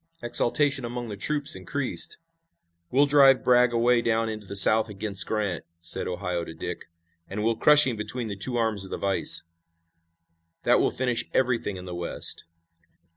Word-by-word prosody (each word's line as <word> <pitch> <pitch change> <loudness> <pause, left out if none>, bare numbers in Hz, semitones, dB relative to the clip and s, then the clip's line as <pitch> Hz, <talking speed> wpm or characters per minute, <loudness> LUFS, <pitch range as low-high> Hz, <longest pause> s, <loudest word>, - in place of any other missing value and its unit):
Exultation 135 +3 -1
among 120 0 -6
the 105 - -6
troops 145 +8 0
increased. 130 +9 -4 0.7
"We'll 140 +3 +2
drive 140 -2 +4
Bragg 125 -1 +3
away 120 +1 +1
down 115 -1 -1
into 110 -2 -8
the 100 - -8
South 110 +3 +6
against 100 -1 -4
Grant," 105 -6 -3
said 85 0 -1
Ohio 90 -1 -4
to 80 - -10
Dick, - - -7 0.4
"and 105 +2 -5
we'll 115 +1 0
crush 150 +5 +7
him 125 -4 -3
between 110 +3 -3
the 100 - -6
two 120 +6 -1
arms 110 -4 -1
of 95 - -7
the - - -5
vise. 100 -1 +3 1.2
That - - +3
will - - +1
finish 125 -2 -2
everything 120 -6 -1
in 90 - -10
the 90 - -8
West." 85 0 -1
115 Hz, 170 wpm, -24 LUFS, 100-125 Hz, 1.2 s, crush